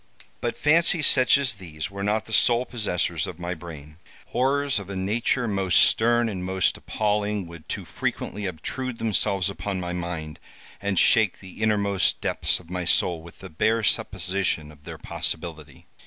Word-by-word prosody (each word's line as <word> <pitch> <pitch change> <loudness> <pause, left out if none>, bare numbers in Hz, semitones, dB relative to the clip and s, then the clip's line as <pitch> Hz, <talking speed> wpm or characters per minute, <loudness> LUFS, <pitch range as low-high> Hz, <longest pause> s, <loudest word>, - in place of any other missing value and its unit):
But 120 - -3
fancies 165 0 +3
such 130 0 +6
as 140 -4 +1
these 90 -2 -7
were 100 0 -6
not 105 +2 0
the 115 - -8
sole 120 +3 +4
possessors 90 -9 -1
of 85 - -7
my 90 0 -3
brain. 80 -3 -10 0.3
Horrors 135 0 +1
of 100 -1 -9
a 100 - -5
nature 115 +6 0
most 95 -3 0
stern 120 +1 +4
and 95 -4 -4
most 95 0 +1
appalling 105 -2 -1
would 85 -2 -12
too - - -4
frequently 100 0 -3
obtrude 125 - -4
themselves 100 -4 0
upon 100 -1 -3
my 90 -1 -4
mind, 85 -3 -5 0.4
and 100 -1 -1
shake 110 -1 +4
the 95 +2 -12
innermost 100 -3 +1
depths - - 0
of 90 - -16
my 90 0 -2
soul 85 0 +2
with 85 0 -14
the - - -8
bare 110 +8 +1
supposition 90 -6 0
of 75 -1 -19
their - - -7
possibility. 80 -4 -5
100 Hz, 170 wpm, -25 LUFS, 85-110 Hz, 0.4 s, such